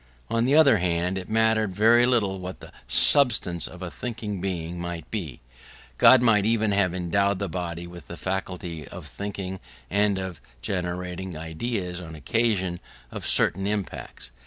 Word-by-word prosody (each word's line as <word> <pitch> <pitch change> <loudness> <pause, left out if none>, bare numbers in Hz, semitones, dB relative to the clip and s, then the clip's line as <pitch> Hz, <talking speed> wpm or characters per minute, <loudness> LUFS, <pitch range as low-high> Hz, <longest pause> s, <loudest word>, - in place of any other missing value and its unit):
On 115 +1 +2
the 135 +3 +3
other 140 -7 +6
hand 90 +1 0
it 90 - -9
mattered 110 -3 +2
very 115 +4 +5
little 100 -6 +1
what 90 0 -7
the - - -12 0.2
substance 105 - +4
of 90 0 -10
a 90 - -5
thinking 105 -5 -5
being 90 -2 -4
might 85 -1 -6
be: 85 - -5 0.6
God 130 -2 +7
might 110 -4 +4
even 110 -1 +1
have 95 -3 +1
endowed 100 +3 +1
the 100 +1 -3
body 85 -1 -4
with 85 -3 -11
the 85 - -8
faculty 90 -3 -4
of - - -10
thinking, 95 -2 -5 0.3
and 100 0 +2
of 95 -4 -6 0.2
generating 90 +3 -4
ideas 90 +3 -4
on 80 -2 -9
occasion 95 - 0 0.3
of - - -4
certain 95 0 +3
impacts. 100 -10 -5
95 Hz, 160 wpm, -25 LUFS, 85-105 Hz, 0.6 s, God